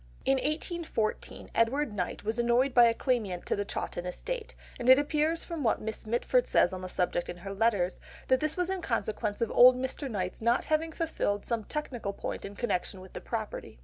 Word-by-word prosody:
In 270 Hz, -, +3 dB
1814, 305 Hz, -5 st, -3 dB
Edward 245 Hz, +2 st, +1 dB
Knight 180 Hz, -3 st, -3 dB
was 220 Hz, +3 st, -1 dB
annoyed 240 Hz, +3 st, +3 dB
by 240 Hz, -1 st, +8 dB
a 230 Hz, -, +4 dB
claimant 215 Hz, -10 st, -1 dB
to -, -, 0 dB
the 205 Hz, -, -1 dB
Chawton 180 Hz, -3 st, -4 dB
estate, 460 Hz, -, -5 dB, 0.2 s
and 240 Hz, -, 0 dB
it 260 Hz, -, +10 dB
appears 305 Hz, +3 st, +1 dB
from 335 Hz, -3 st, -5 dB
what 225 Hz, -, +2 dB
Miss 220 Hz, 0 st, -5 dB
Mitford 245 Hz, -, +2 dB
says -, -, +3 dB
on 185 Hz, -, -5 dB
the 185 Hz, -, -6 dB
subject 175 Hz, -1 st, -1 dB
in 175 Hz, -, -5 dB
her 195 Hz, +3 st, -7 dB
letters, 200 Hz, -4 st, +1 dB, 0.3 s
that 260 Hz, 0 st, +4 dB
this 310 Hz, +3 st, 0 dB
was 360 Hz, +1 st, 0 dB
in 380 Hz, -1 st, -2 dB
consequence 220 Hz, -6 st, -2 dB
of 230 Hz, -, 0 dB
old 250 Hz, +1 st, +8 dB
Mr. 260 Hz, +2 st, -3 dB
Knight's 185 Hz, -4 st, -3 dB
not 235 Hz, +2 st, +2 dB
having 315 Hz, +1 st, 0 dB
fulfilled 310 Hz, -11 st, -2 dB
some 230 Hz, -3 st, -1 dB
technical 245 Hz, -9 st, -4 dB
point -, -, -5 dB
in 200 Hz, +1 st, -8 dB
connection 195 Hz, -4 st, -2 dB
with 185 Hz, 0 st, -13 dB
the -, -, -6 dB
property. 220 Hz, -, -5 dB
235 Hz, 205 wpm, -29 LUFS, 205-295 Hz, 0.3 s, it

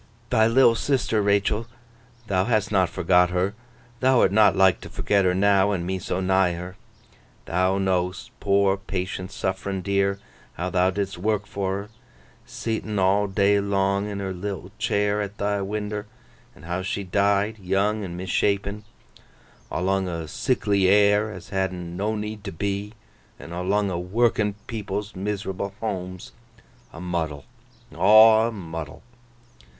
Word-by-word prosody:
'Thy 110 Hz, 0 st, +4 dB
little 120 Hz, 0 st, +5 dB
sister, 115 Hz, -3 st, 0 dB
Rachael, 100 Hz, +2 st, +1 dB, 0.6 s
thou 95 Hz, -3 st, +1 dB
hast 110 Hz, -3 st, +1 dB
not 95 Hz, -4 st, +3 dB
forgot 90 Hz, 0 st, +3 dB
her. 90 Hz, +3 st, 0 dB, 0.5 s
Thou'rt 130 Hz, -6 st, +4 dB
not 105 Hz, +1 st, +5 dB
like 95 Hz, -2 st, +4 dB
to -, -, -9 dB
forget 100 Hz, -2 st, +1 dB
her 90 Hz, 0 st, +2 dB
now, 100 Hz, 0 st, +4 dB
and 90 Hz, -4 st, -1 dB
me 95 Hz, +1 st, -2 dB
so 90 Hz, -, -3 dB
nigh 95 Hz, -1 st, +2 dB
her. 90 Hz, +2 st, -7 dB, 0.7 s
Thou 95 Hz, +2 st, +1 dB
know'st—poor, 95 Hz, +1 st, 0 dB
patient, 95 Hz, -1 st, -4 dB
suff'rin, 95 Hz, -2 st, -3 dB
dear—how 100 Hz, -2 st, -3 dB
thou 90 Hz, 0 st, +3 dB
didst 100 Hz, -1 st, -3 dB
work 105 Hz, +1 st, 0 dB
for 95 Hz, -2 st, -2 dB
her, 105 Hz, -, -15 dB, 0.6 s
seet'n 110 Hz, -2 st, -3 dB
all 100 Hz, +2 st, +3 dB
day 100 Hz, +1 st, +3 dB
long 100 Hz, 0 st, 0 dB
in 100 Hz, -, -4 dB
her 95 Hz, -1 st, -3 dB
little 95 Hz, 0 st, -6 dB
chair 105 Hz, 0 st, +1 dB
at 100 Hz, 0 st, -5 dB
thy 100 Hz, 0 st, -1 dB
winder, 105 Hz, +1 st, -4 dB, 0.5 s
and -, -, -15 dB
how 90 Hz, +2 st, -2 dB
she 100 Hz, +1 st, -3 dB
died, 100 Hz, +3 st, +1 dB
young 100 Hz, +3 st, 0 dB
and 90 Hz, -2 st, -6 dB
misshapen, 100 Hz, +3 st, -1 dB, 0.9 s
awlung 95 Hz, +1 st, 0 dB
o' 85 Hz, -2 st, -4 dB
sickly 100 Hz, +2 st, +1 dB
air 105 Hz, +2 st, +4 dB
as 90 Hz, -4 st, -10 dB
had'n 90 Hz, -3 st, -3 dB
no 105 Hz, +4 st, -1 dB
need 105 Hz, 0 st, -5 dB
to 100 Hz, -, -5 dB
be, 100 Hz, +4 st, -3 dB, 0.4 s
an' 85 Hz, -, -10 dB
awlung 95 Hz, +3 st, 0 dB
o' 85 Hz, -, -2 dB
working 105 Hz, +2 st, +1 dB
people's 105 Hz, -2 st, -5 dB
miserable 100 Hz, 0 st, -4 dB
homes. 95 Hz, -4 st, -5 dB, 0.6 s
A -, -, -10 dB
muddle! 80 Hz, -5 st, -3 dB, 0.5 s
Aw 110 Hz, +2 st, +7 dB
a -, -, -3 dB
muddle! 80 Hz, -7 st, -7 dB
100 Hz, 145 wpm, -24 LUFS, 95-105 Hz, 0.9 s, Aw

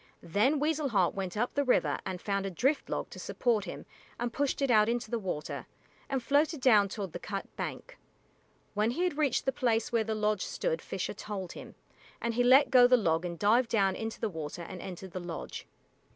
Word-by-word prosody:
Then 210 Hz, -, +2 dB
Weasel 300 Hz, -1 st, 0 dB
Heart 195 Hz, -6 st, +2 dB
went 195 Hz, 0 st, -4 dB
up 240 Hz, +3 st, 0 dB
the 285 Hz, -, +1 dB
river 255 Hz, -, +2 dB
and 185 Hz, -1 st, -4 dB
found 200 Hz, 0 st, -1 dB
a -, -, -2 dB
drift 265 Hz, -, 0 dB
log -, -, -3 dB
to -, -, -9 dB
support 230 Hz, -5 st, 0 dB
him 175 Hz, -, -7 dB, 0.3 s
and 240 Hz, 0 st, -2 dB
pushed 285 Hz, -1 st, 0 dB
it 275 Hz, -2 st, +1 dB
out 215 Hz, -1 st, +5 dB
into 235 Hz, -2 st, -2 dB
the 235 Hz, -, 0 dB
water, 180 Hz, -7 st, -4 dB, 0.4 s
and 265 Hz, -3 st, -1 dB
floated 295 Hz, +3 st, +2 dB
down 215 Hz, -6 st, +5 dB
toward 195 Hz, -4 st, -5 dB
the 175 Hz, -, -5 dB
cut 195 Hz, +1 st, -6 dB
bank. -, -, -6 dB, 0.7 s
When 210 Hz, +2 st, +1 dB
he 300 Hz, +9 st, -1 dB
had 350 Hz, -5 st, -1 dB
reached 290 Hz, -4 st, +1 dB
the 265 Hz, -, +2 dB
place 235 Hz, -4 st, 0 dB
where 230 Hz, -2 st, +2 dB
the 220 Hz, 0 st, -2 dB
lodge 210 Hz, -2 st, 0 dB
stood -, -, -2 dB
Fisher -, -, -4 dB
told 195 Hz, -4 st, -6 dB
him, -, -, -10 dB, 0.4 s
and 235 Hz, 0 st, -1 dB
he 245 Hz, +2 st, +2 dB
let 265 Hz, +4 st, +6 dB
go 250 Hz, -2 st, +8 dB
the 250 Hz, 0 st, +6 dB
log 165 Hz, -5 st, +1 dB
and 170 Hz, -1 st, -4 dB
dived 230 Hz, +5 st, +3 dB
down 195 Hz, -4 st, +2 dB
into 225 Hz, 0 st, -5 dB
the 225 Hz, -, 0 dB
water 160 Hz, -2 st, -6 dB
and 180 Hz, +1 st, -8 dB
entered 190 Hz, 0 st, -8 dB
the 185 Hz, -, -4 dB
lodge. 175 Hz, -2 st, -6 dB
220 Hz, 215 wpm, -30 LUFS, 195-255 Hz, 0.7 s, go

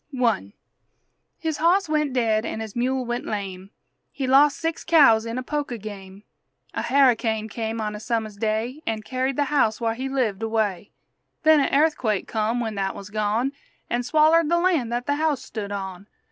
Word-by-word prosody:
I 225 Hz, -, +1 dB, 0.8 s
His 320 Hz, -3 st, -3 dB
hoss 350 Hz, +4 st, +3 dB
went 300 Hz, -2 st, 0 dB
dead 225 Hz, -3 st, +1 dB
an' 220 Hz, -, -4 dB
his 220 Hz, -2 st, -7 dB
mule 255 Hz, +1 st, 0 dB
went 240 Hz, +1 st, -3 dB
lame; 195 Hz, -2 st, -5 dB, 0.4 s
He 275 Hz, -, -3 dB
lost 275 Hz, +3 st, +5 dB
six 325 Hz, 0 st, -3 dB
cows 255 Hz, -9 st, +5 dB
in 230 Hz, +2 st, -4 dB
a 255 Hz, -, -3 dB
poker 285 Hz, -3 st, -3 dB
game; 200 Hz, -2 st, -10 dB, 0.5 s
A -, -, -2 dB
harricane 235 Hz, -5 st, +2 dB
came 225 Hz, +1 st, -4 dB
on 210 Hz, -1 st, -2 dB
a 210 Hz, -, -6 dB
summer's 220 Hz, -2 st, -2 dB
day, 220 Hz, +7 st, -2 dB
An' 220 Hz, -1 st, -2 dB
carried 260 Hz, +3 st, -2 dB
the 290 Hz, -, +2 dB
house 225 Hz, -7 st, +2 dB
whar' 230 Hz, -1 st, 0 dB
he 260 Hz, +3 st, -4 dB
lived 235 Hz, -7 st, -1 dB
away; 220 Hz, -4 st, -1 dB, 0.5 s
Then 315 Hz, -1 st, +6 dB
a 275 Hz, -, +2 dB
airthquake 275 Hz, -9 st, +1 dB
come 220 Hz, +2 st, -1 dB
when 225 Hz, -2 st, -2 dB
that 195 Hz, -1 st, -2 dB
wuz 200 Hz, +1 st, -9 dB
gone, 215 Hz, +5 st, 0 dB, 0.4 s
An' 240 Hz, -, +1 dB
swallered 310 Hz, +4 st, +4 dB
the 345 Hz, -, +3 dB
lan' 340 Hz, -9 st, +1 dB
that 240 Hz, +1 st, -2 dB
the 285 Hz, 0 st, 0 dB
house 300 Hz, -4 st, 0 dB
stood 205 Hz, -3 st, -6 dB
on! 195 Hz, -1 st, -6 dB
235 Hz, 185 wpm, -24 LUFS, 215-280 Hz, 0.8 s, Then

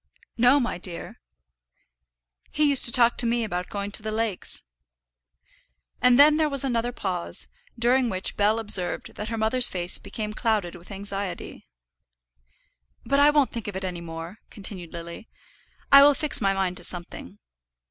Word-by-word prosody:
"No, 250 Hz, +4 st, +4 dB
my 240 Hz, -8 st, -3 dB
dear." 175 Hz, -2 st, -8 dB, 1.3 s
"He 300 Hz, -, -1 dB
used 280 Hz, -2 st, +5 dB
to 235 Hz, -, +7 dB
talk 240 Hz, -2 st, +4 dB
to 240 Hz, -, 0 dB
me 235 Hz, 0 st, 0 dB
about 180 Hz, -4 st, -4 dB
going 200 Hz, 0 st, -5 dB
to 205 Hz, -, -1 dB
the 215 Hz, -, -5 dB
lakes." 220 Hz, -3 st, -2 dB, 1.4 s
And 250 Hz, -1 st, +5 dB
then 300 Hz, +1 st, +7 dB
there 310 Hz, -1 st, +1 dB
was 275 Hz, -2 st, +1 dB
another 240 Hz, -2 st, -1 dB
pause, 185 Hz, -7 st, -4 dB, 0.3 s
during 245 Hz, +1 st, +2 dB
which 185 Hz, -1 st, -3 dB
Bell 210 Hz, +2 st, +2 dB
observed 205 Hz, -5 st, 0 dB
that 210 Hz, -, -6 dB
her 225 Hz, -, -4 dB
mother's 240 Hz, +3 st, +4 dB
face 175 Hz, -1 st, -1 dB
became 215 Hz, -1 st, -6 dB
clouded 215 Hz, -6 st, -1 dB
with 175 Hz, 0 st, -14 dB
anxiety. 200 Hz, -1 st, -5 dB, 1.4 s
"But 275 Hz, -, +1 dB
I 290 Hz, +1 st, +6 dB
won't 295 Hz, -3 st, +2 dB
think 230 Hz, -3 st, -6 dB
of 205 Hz, -, -6 dB
it 190 Hz, -, -5 dB
any 180 Hz, -2 st, -5 dB
more," 165 Hz, +4 st, -8 dB
continued 190 Hz, -4 st, -5 dB
Lily; 170 Hz, +5 st, -9 dB, 0.6 s
"I 275 Hz, -, +10 dB
will 285 Hz, 0 st, +6 dB
fix 300 Hz, -4 st, -1 dB
my 195 Hz, -1 st, +1 dB
mind 185 Hz, -2 st, -2 dB
to 175 Hz, -, -4 dB
something." 170 Hz, -, -5 dB
215 Hz, 165 wpm, -25 LUFS, 185-245 Hz, 1.4 s, I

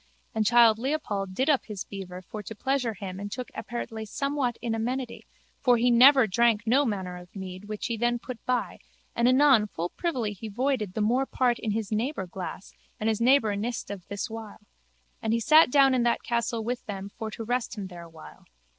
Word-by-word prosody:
And 215 Hz, -1 st, +1 dB
childe 230 Hz, -2 st, +6 dB
Leopold 215 Hz, -9 st, -2 dB
did 265 Hz, +6 st, 0 dB
up 290 Hz, -4 st, +3 dB
his 210 Hz, -4 st, -5 dB
beaver 185 Hz, -2 st, -8 dB
for 210 Hz, +4 st, -7 dB
to 220 Hz, +2 st, -8 dB
pleasure 250 Hz, -1 st, -1 dB
him 190 Hz, -2 st, -7 dB
and 205 Hz, 0 st, -6 dB
took 250 Hz, +2 st, -6 dB
apertly 235 Hz, -2 st, -5 dB
somewhat 275 Hz, 0 st, -1 dB
in 235 Hz, -1 st, -2 dB
amity 245 Hz, +2 st, -3 dB, 0.3 s
for 245 Hz, -3 st, +4 dB
he 245 Hz, +1 st, +3 dB
never 260 Hz, +2 st, +7 dB
drank 220 Hz, +1 st, +2 dB
no 265 Hz, +6 st, +3 dB
manner 190 Hz, -6 st, -3 dB
of 180 Hz, +2 st, -14 dB
mead 185 Hz, 0 st, -7 dB
which 210 Hz, 0 st, -5 dB
he 230 Hz, -2 st, -2 dB
then 240 Hz, +1 st, +1 dB
put 240 Hz, 0 st, -9 dB
by 250 Hz, -1 st, -1 dB, 0.4 s
and 235 Hz, -, +3 dB
anon 255 Hz, -4 st, +5 dB
full 175 Hz, -3 st, -4 dB
privily 250 Hz, -, -2 dB
he 215 Hz, +3 st, -8 dB
voided 220 Hz, -3 st, -1 dB
the 220 Hz, -, -1 dB
more 250 Hz, +6 st, +2 dB
part 245 Hz, -2 st, +1 dB
in 225 Hz, -, -3 dB
his 215 Hz, 0 st, -2 dB
neighbour 220 Hz, 0 st, -1 dB
glass 185 Hz, +1 st, -7 dB, 0.3 s
and 215 Hz, -, 0 dB
his 220 Hz, 0 st, -1 dB
neighbour 235 Hz, -4 st, +4 dB
nist 230 Hz, +4 st, -3 dB
not 200 Hz, -, -3 dB
of 180 Hz, -, -22 dB
this 200 Hz, +2 st, -4 dB
wile. 225 Hz, -2 st, -9 dB, 0.6 s
And 220 Hz, -, 0 dB
he 230 Hz, -, +2 dB
sat 310 Hz, +7 st, +6 dB
down 270 Hz, 0 st, +5 dB
in 255 Hz, -, +2 dB
that 235 Hz, 0 st, +1 dB
castle 235 Hz, -1 st, -1 dB
with 245 Hz, +2 st, -3 dB
them 195 Hz, -1 st, -5 dB
for 220 Hz, +2 st, -6 dB
to 225 Hz, -, -7 dB
rest 245 Hz, 0 st, -2 dB
him 200 Hz, -, -4 dB
there 175 Hz, -2 st, -9 dB
awhile. 165 Hz, -, -13 dB
225 Hz, 210 wpm, -27 LUFS, 205-250 Hz, 0.6 s, never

